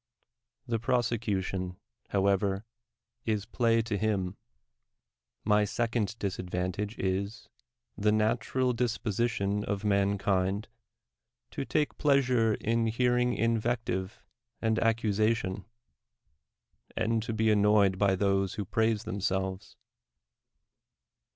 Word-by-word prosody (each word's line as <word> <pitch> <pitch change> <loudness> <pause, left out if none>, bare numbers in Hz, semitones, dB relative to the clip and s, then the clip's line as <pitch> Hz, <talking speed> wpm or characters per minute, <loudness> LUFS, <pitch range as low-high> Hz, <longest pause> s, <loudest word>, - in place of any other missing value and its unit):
The 115 -3 -1
prose 120 +1 +1
cution, 95 -5 -2 0.3
however, 100 +1 +1 0.6
is 105 -2 -1
play 115 0 +2
to 110 -3 -2
him. 100 -4 0 1.1
My 105 0 +4
second 115 +1 -1
dis 100 -4 -3
advantage 90 +4 -3
is, 100 +3 -2 0.5
the 105 +1 +2
natural 115 +4 +1
disposition 110 -3 -1
of 100 -1 -3
mankind 100 0 +1 0.8
to - - -4
take 150 +1 -1
pleasure 125 -6 +3
in 115 +1 0
hearing 125 +1 +2
invective 115 -4 -1 0.4
and 110 -1 +1
accusa 110 -1 +2
tion, 95 -2 -5 1.3
and 115 0 +1
to 115 - -4
be 110 0 +2
annoyed 105 -2 +4
by 100 -2 +3
those 95 0 +1
who 105 -3 -3
praise 110 +1 +1
themselves. 95 -1 -3
105 Hz, 100 wpm, -29 LUFS, 100-115 Hz, 1.3 s, My